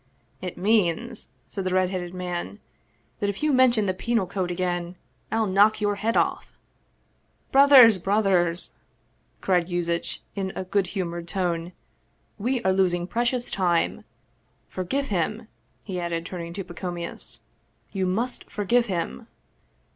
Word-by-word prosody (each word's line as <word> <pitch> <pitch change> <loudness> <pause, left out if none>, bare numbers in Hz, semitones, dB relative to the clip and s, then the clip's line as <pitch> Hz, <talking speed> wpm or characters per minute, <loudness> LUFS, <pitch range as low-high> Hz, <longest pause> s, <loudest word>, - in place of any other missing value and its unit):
" - - -39
It 180 - -7
means," 215 +3 +1 0.2
said 195 - -5
the 185 0 -1
red 185 0 +2
headed 180 -2 -4
man, 175 - -4 0.3
" - - -40
that 205 - 0
if 200 +8 -5
you 305 -2 +3
men 255 -1 +6
tion 220 -3 0
the 185 - +1
Penal 230 +1 0
Code 180 0 -3
again 175 0 -2 0.4
I'll 225 0 +2
knock 205 +2 +4
your 205 -1 +1
head 225 +3 0
off! - - -1 0.3
" - - -42
" - - -42
Brothers, 265 -7 +8
brothers! 185 -3 +1 0.3
" - - -41
cried 180 -3 +2
Yuzitch 170 -1 -2
in 190 -1 -3
a - - -3
good 190 0 0
humored 170 -2 -3
tone; 175 -2 -2 0.3
" - - -42
we 250 -1 0
are 190 - +3
losing 180 -2 +2
precious 240 +4 0
time! 175 -3 +1 0.7
Forgive 270 +10 -2
him! 215 +4 -1 0.2
" - - -41
he 185 -3 -4
added, 170 -1 -3
turning 170 -2 -6
to 195 - -4
Pacomius. 175 -1 -6 0.2
" - - -42
You 190 -2 -1
must 235 +7 -2
forgive 235 +4 +1
him 170 - -3
185 Hz, 160 wpm, -25 LUFS, 175-215 Hz, 0.7 s, Brothers